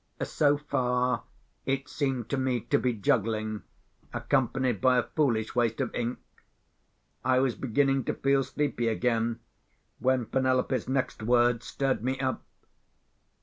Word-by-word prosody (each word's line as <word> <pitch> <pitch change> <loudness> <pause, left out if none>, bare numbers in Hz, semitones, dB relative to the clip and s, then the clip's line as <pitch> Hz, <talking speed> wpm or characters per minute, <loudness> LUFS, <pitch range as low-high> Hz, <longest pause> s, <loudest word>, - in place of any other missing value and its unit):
(So 145 -1 +2
far, 125 -3 0 0.4
it 135 0 -1
seemed 135 -5 -2
to 140 - 0
me 130 -2 0
to - - +1
be 125 - +1
juggling, 110 0 0 0.5
accompanied 130 -5 0
by 130 -1 +4
a 125 - +3
foolish 120 -8 0
waste 115 -2 +1
of - - -1
ink. 120 +1 -2 1.1
I 130 0 +3
was 130 -1 +2
beginning 135 +3 +1
to - - -1
feel 135 0 +2
sleepy 135 -4 -1
again, 115 0 0 0.6
when 130 -1 +2
Penelope's 130 -1 0
next 130 -2 -1
words 120 +1 +2
stirred 135 -4 -1
me 130 +1 -1
up.) 130 -1 -1
125 Hz, 135 wpm, -28 LUFS, 115-135 Hz, 1.1 s, by